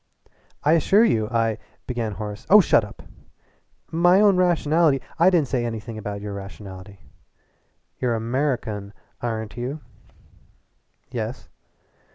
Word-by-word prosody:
"I 150 - +3
assure 195 +7 +4
you 110 - +1
I 115 -2 0
" - - -37
began 120 -4 -3
Horace. 105 +1 -7
"Oh 210 - +9
shut 170 - +4
up!" 105 - -11 0.9
"My 175 +3 +4
own 205 -2 +5
rationality 165 -4 +3
" - - -25
"I 170 +3 +6
didn't 170 -6 +2
say 125 -2 -1
anything 115 0 -5
about 105 -1 -5
your 105 -1 -5
nationality. 95 -1 -11 1.0
You're 120 -2 0
Amuricun, 115 -4 -2 0.3
ar'n't 110 -3 -4
you?" 130 +6 -4 1.3
"Yes." - - -5
120 Hz, 130 wpm, -23 LUFS, 105-155 Hz, 1.3 s, Oh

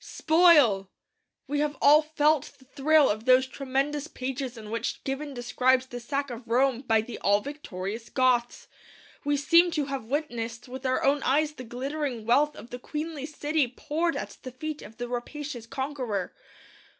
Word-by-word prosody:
Spoil! 300 - +4 0.6
We 290 +1 -2
have 295 0 -1
all 295 +2 +7
felt 305 -1 +1
the 260 - -21
thrill 295 +2 +4
of 215 +2 -2
those 255 0 +5
tremendous 275 +2 -2
pages 255 -3 -5
in 215 -1 -9
which 230 - -3
Gibbon 280 +1 -4
describes 255 +1 +2
the 245 -2 -7
sack 275 +3 -3
of 235 0 -8
Rome 250 +1 +2
by 225 -4 +2
the 230 +2 -8
all 205 +1 +3
victorious 225 -5 -6
Goths. 250 -2 +1 0.6
We 290 0 +1
seem 335 +5 +5
to 305 -4 -1
have 275 -4 -4
witnessed 240 -4 -3
with 260 +1 -5
our 255 - 0
own 280 +1 +3
eyes 295 +3 +2
the 255 - -9
glittering 255 0 -4
wealth 290 +6 +3
of 235 - -12
the 245 - -6
queenly 300 +1 -5
city 300 -1 0
poured 320 +7 -2
at - - -6
the 255 - -7
feet 305 +4 -6
of 225 - -12
the 245 0 -4
rapacious 245 0 -5
conqueror. 255 -8 -3
265 Hz, 170 wpm, -27 LUFS, 240-295 Hz, 0.6 s, all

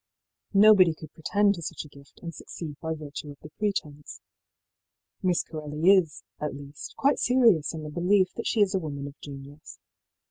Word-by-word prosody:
Nobody 195 -5 +7
could 155 -1 -12
pretend 200 +5 +2
to 170 - -8
such 155 - -5
a - - -11
gift 140 -1 -18
and 170 -1 -6
succeed 155 -2 -8
by 160 -1 -2
virtue 150 -1 -8
of 145 - -10
the 150 - -11
pretence. 150 -9 -3 1.0
Miss 180 -2 +1
Corelli 155 +3 +1
is, 180 -6 +2 0.2
at 150 -1 -3
least, 140 +1 -10
quite 280 +1 +2
serious 235 - +4
in 155 - -6
the 150 - -7
belief 185 +3 +2
that - - -4
she 220 - +1
is 200 -1 +3
a 190 - +1
woman 145 -4 -5
of 140 - -7
genius. 140 +1 -10
160 Hz, 180 wpm, -27 LUFS, 145-190 Hz, 1.0 s, Nobody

